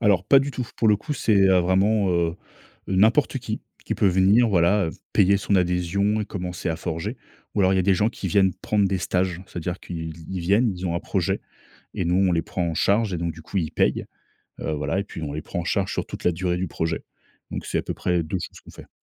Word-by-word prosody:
Alors 100 -5 +3
pas 135 - +6
du 140 +1 -1
tout. 125 -3 -4
Pour 110 - +2
le 105 - +5
coup, 150 +9 -5
c'est, 110 -6 +2
heu, 95 -1 +5
vraiment, 95 +2 +2
heu, 85 0 +1 0.5
n'importe 110 +9 +3
qui, 110 -3 -4 0.2
qui - - -2
peut - - +2
venir, 95 +6 +4
voilà, 90 0 +3 0.2
payer 100 +1 +4
son 100 +1 0
adhésion 90 +4 +1
et 105 - -1
commencer 90 -3 -5
à 80 - -1
forger. 80 0 -4 0.4
Ou 100 - +1
alors, 95 0 +4
il - - +2
y - - +3
a - - +3
des 95 +1 +3
gens 105 +4 +2
qui 110 - -6
viennent 95 +1 +3
prendre 105 -2 +1
des 95 -1 0
stages, 90 0 -1
c'est-à-dire 90 0 -4
qu'ils 80 -2 -6
ils 95 -1 -3
viennent, 100 +6 +3
ils 90 +1 -4
ont 85 - -1
un 85 - -1
projet - - -1 0.5
et - - -2
nous, 85 +1 +2
on 95 -1 +3
les 85 -1 +2
prend 90 +2 -3
en 80 - -3
charge 100 +4 +2
et - - -1
donc 85 0 -2
du 80 - -12
coup, 95 - -5
ils 80 -4 -1
payent. - - +1 0.6
Heu, 80 - -2
voilà 75 +5 -1
et - - -3
puis, 85 -5 -8
on 70 - -4
les 75 +1 -4
prend 85 - -4
en - - -5
charge 95 +2 0
sur - - -2
toute - - -8
la 90 - +3
durée 90 +1 -1
du 90 +1 -1
projet. 80 +1 -2 0.5
Donc, - - -5
c'est - - -1
à - - -1
peu - - -4
près 90 -1 0
2 85 +4 -3
choses - - -8
qu'on - - -15
fait. - - -13
95 Hz, 255 wpm, -24 LUFS, 85-100 Hz, 0.6 s, pas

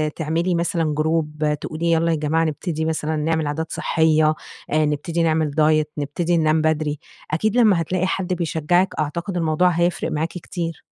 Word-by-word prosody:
تعملي 165 +3 0
مثلًا 165 -3 0
group، 155 -1 0 0.2
تقولي 170 +2 -2
يلّا 165 0 +2
يا 160 - +1
جماعة 155 +2 +1
نبتدي 160 0 -2
مثلًا 160 -1 -1
نعمل 160 0 0
عادات 160 +2 -3
صحية، 155 -1 +2 0.4
آآ 155 0 +3
نبتدي 160 +3 -1
نعمل 155 -2 +1
diet، 155 -1 +3
نبتدي 165 +4 0
ننام 155 0 +2
بدري. 155 -2 0 0.3
أكيد 215 +9 0
لمّا 205 -8 +5
هتلاقي 185 +3 -1
حد 185 -1 -1
بيشجعِك، 175 +2 +1
أعتقد 170 +5 -2
الموضوع 165 +2 +2
هيفرق 175 +1 0
معاكِ 155 +2 0
كتير. 170 -2 -6
160 Hz, 160 wpm, -21 LUFS, 155-170 Hz, 0.4 s, لمّا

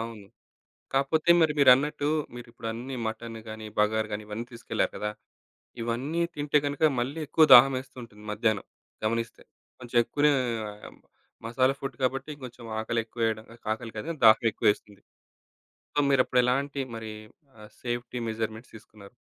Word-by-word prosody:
అవును. 115 -3 -7 0.7
కాకపోతే 155 +5 +1
మరి 155 -2 +3
మీరన్నట్టు. 145 +3 +5 0.3
మీరు 120 0 -9
ఇప్పుడు 115 -1 -8
అన్నీ 125 +4 -6
మటన్ 115 +1 -6
గాని, 110 0 -7
బగారు 110 +1 +2
గాని 105 +1 -4
ఇవన్నీ 110 +3 -5
తీసుకెళ్లారు 115 - -2
గదా! 105 0 -2 0.7
ఇవన్నీ 130 +9 -2
తింటే 150 0 +2
గనుక 145 +2 +2
మళ్ళీ 135 +6 -3
ఎక్కువ 160 - +5
దాహం 135 +3 +9
వేస్తూ 130 0 -12
ఉంటుంది. 105 -2 -14
మధ్యాహ్నం 110 -1 0 0.4
గమనిస్తే. 115 +1 -2 0.4
కొంచెం 120 -1 -7
ఎక్కువనే 145 +4 +2 1.1
మసాలా 130 +4 +2
ఫుడ్ 135 -3 -5
కాబట్టి 135 +4 -1
కొంచెం 120 -1 -9 0.2
ఆకలెక్కువ 115 +1 -3
వేయడం 110 -1 -1 0.3
ఆకలి 115 0 -6
కాదు 105 - -5
గాని 155 - -6
దాహం 110 +1 +6
ఎక్కువ - - -3
వేస్తుంది. 105 -1 -6 0.9
సో - - -4
మీరు 135 -2 +5
అప్పుడు 125 - +3
ఎలాంటి 140 +3 0 0.2
మరి 110 -1 -6 0.5
ఆహ్, 105 0 -13
సేఫ్టీ 120 0 -3
మెజర్మెంట్స్ 110 +1 -4
తీసుకున్నారు? 105 0 -14
120 Hz, 145 wpm, -27 LUFS, 110-135 Hz, 1.1 s, దాహం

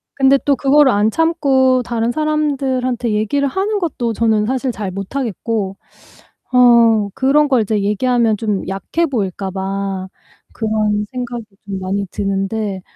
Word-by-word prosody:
근데 270 0 +4
또 280 -1 +3
그거를 275 0 +4
안 205 +2 +2
참고 270 -4 +2
다른 235 0 -1
사람들한테 265 -5 -1
얘기를 275 +7 0
하는 400 +7 -1
것도 245 -10 -2
저는 220 -1 +1
사실 260 +1 -1
잘 205 -4 -5
못 195 +7 -7
하겠고 220 -5 -2 0.8
어 230 -4 +5
그런 290 +3 +2
걸 255 -4 +3
이제 210 -1 0
얘기하면 225 +1 +1
좀 210 -3 -2
약해 195 - -1
보일까 195 - -3
봐 195 0 -3 0.5
그런 215 -1 0
생각이 245 -2 -5 0.2
좀 195 -1 -5
많이 195 +2 -2
드는데 195 0 -2
230 Hz, 280 characters per minute, -17 LUFS, 205-265 Hz, 0.8 s, 어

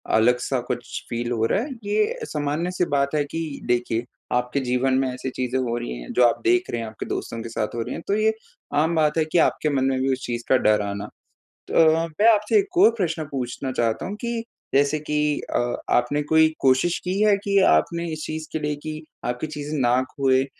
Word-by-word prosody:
अलग-सा 125 +3 +2
कुछ 120 -1 -4
फील 120 +1 -3
हो 115 -1 +1
रहा 195 - +1
है। 290 - -6
ये 210 +1 0
सामान्य-सी 160 +5 -1
बात 140 +1 +1
है 150 - +2
कि 160 -3 -4
देखिए 120 -1 0 0.3
आपके 125 +3 -1
जीवन 125 +1 +1
में 135 - +1
ऐसी 130 +1 -4
चीज़ें 125 0 -2
हो 120 -2 -1
रही 120 - -4
हैं - - -8
जो 125 - +4
आप 115 - -1
देख 360 +1 +2
रहे - - -2
हैं, 115 - -4
आपके 110 - -7
दोस्तों 115 - -4
के 115 - -6
साथ 110 -1 -3
हो 115 - -2
रही - - -4
हैं, - - -6
तो 200 - +1
ये 215 +1 +2 0.4
आम 160 +3 +2
बात 155 0 +2
है 160 - +3
कि 155 +3 -1
आपके 155 - 0
मन 135 -3 +1
में 135 -1 +1
भी 135 0 +1
उस 130 - -5
चीज़ 120 -1 -3
का 130 - +6
डर 105 -3 +3
आना। 100 0 -4 0.6
तो - - +4 0.2
मैं 185 +8 +2
आपसे 210 - +2
एक 390 -3 -4
और 350 - +7
प्रश्न 165 -5 -1
पूछना 130 0 -3
चाहता 115 -3 0
हूँ 200 - -4
कि 235 -1 -2 0.3
जैसे 145 +2 +3
कि 150 0 -3 0.4
अ, 120 0 +1
आपने 125 +5 +2
कोई 160 +1 +4
कोशिश 135 +6 +3
की 185 +2 -1
है 210 -1 +5
कि 200 -1 +3
आपने 170 - +1
इस 155 -1 -5
चीज़ 155 0 -5
के 160 - -2
लिए 150 -1 -1
कि 155 0 -5 0.2
आपकी 125 +5 -2
चीज़ें 150 0 -5
ना 125 0 +3
खोएँ 135 -1 +3
140 Hz, 220 wpm, -23 LUFS, 120-165 Hz, 0.6 s, और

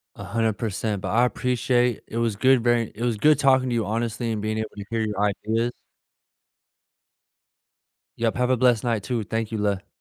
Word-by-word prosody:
100%. 110 -2 -2
But - - -4
I 120 +3 +3
appreciate. 125 -1 0
It 115 - -6
was 115 -3 0
good 130 +2 +3
very 120 -2 +2
it 115 - -5
was 120 -3 0
good 150 +8 +4
talking 130 -2 +3
to - - -1
you, 115 -2 0
honestly, 115 +1 -2
and 105 - -2
being 110 +1 -2
able 110 -1 -3
to 100 -1 -7
hear 115 -1 -1
your 105 -2 -2 0.3
ideas. 115 +2 0 2.5
Yep, 115 -1 +1
have 125 0 +1
a 130 - +3
blessed 120 -2 +3
night, 115 -5 -1
too. 120 -3 -2
Thank 110 +1 -3
you, 110 - -2
le 100 -2 -1
115 Hz, 185 wpm, -24 LUFS, 110-120 Hz, 2.5 s, good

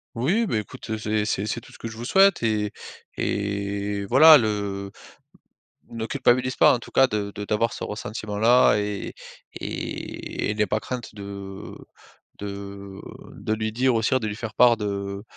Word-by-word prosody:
Oui, 180 - +1
beh, 110 - 0
écoute, 125 +3 -11
heu, 110 - -1
c'est 110 0 0
c'est 105 -1 -1
c'est 115 +2 -3
tout - - -16
ce - - -14
que - - -6
je 115 - -8
vous 115 - -7
souhaite. 195 +8 +4
Et 105 -3 0 0.5
et 100 0 -2
voilà 150 +8 +8
le 100 -3 -2 1.0
ne 115 -1 -4
culpabilise 125 +2 +2
pas - - +6
en 125 - 0
tout - - -12
cas 135 - +6
de 105 -4 -2
de 105 - -4
d'avoir 110 +2 0
ce - - -6
ressentiment-là. 110 +3 +2
Et 105 -1 -4 0.5
et 105 - -4
n'aie 105 0 +2
pas 110 +2 -1
crainte 125 -1 -6
de, 100 - -8
heu 100 -1 -8 0.6
de, 105 - -5
heu, 100 -1 -8 0.3
de 110 - -2
lui 110 0 -2
dire 130 +2 +2
aussi 115 +3 +1
de 110 - -2
lui 105 0 -4
faire 115 -2 -6
part 120 +2 +5
de 100 -1 -4
110 Hz, 180 wpm, -24 LUFS, 100-120 Hz, 1.0 s, voilà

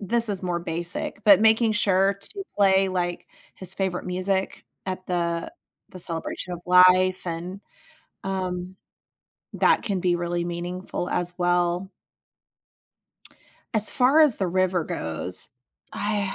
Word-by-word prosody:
this 230 +3 -1
is 195 -2 -3
more 175 -1 -2
basic, 170 +4 -3
but 200 -1 +7
making 220 0 +3
sure 195 -2 +2
to 400 - -3
play, 195 -1 +3
like, 175 -1 -3 0.3
his 185 0 -2
favorite 190 -2 -3
music 190 +1 -2 0.2
at 185 0 -5
the 170 -2 -2 0.4
the 185 - -11
celebration 170 +1 -4
of 175 - -6
life 185 +1 +5
and, 175 +4 -6 0.6
um, 185 -1 -4 0.8
that - - +2
can 200 -5 -2
be 175 -1 +1
really 175 0 -3
meaningful 175 +1 -5
as 175 0 +1
well. 175 +1 0 1.9
As 215 -1 +7
far 270 +5 +3
as 295 -7 +5
the 190 - -1
river 180 -1 0
goes, 80 +3 +1 0.4
I 205 -2 -2
185 Hz, 130 wpm, -24 LUFS, 175-195 Hz, 1.9 s, but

